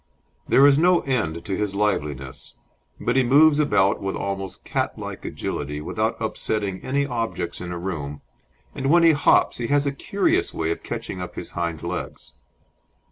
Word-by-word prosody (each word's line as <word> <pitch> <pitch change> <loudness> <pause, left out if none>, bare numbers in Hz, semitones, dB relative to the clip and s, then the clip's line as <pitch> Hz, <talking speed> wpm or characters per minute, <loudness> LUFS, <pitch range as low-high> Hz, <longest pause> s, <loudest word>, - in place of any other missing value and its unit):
There 135 - +6
is 145 0 +6
no 175 +1 +4
end 85 - -2
to 95 - -2
his 100 0 -2
liveliness, 75 -10 -2 0.4
but 120 - 0
he 135 - +5
moves 145 +4 +5
about 100 -10 +2
with 95 0 -2
almost 95 -1 -4
catlike - - -3
agility 75 +1 -4
without 75 - -2
upsetting 100 -3 -2
any 140 +2 0
objects 115 -9 -3
in 90 -1 -5
a 90 - -4
room, 75 -6 -5 0.5
and 135 - -3
when 170 +2 +6
he 165 - +7
hops 145 -2 +3
he 120 - -2
has 145 +1 +2
a 140 - +1
curious 195 +8 0
way 80 0 -1
of - - -3
catching 90 - -5
up 90 -1 -7
his - - -7
hind 85 -3 -3
legs. - - -5
100 Hz, 170 wpm, -23 LUFS, 85-140 Hz, 0.5 s, he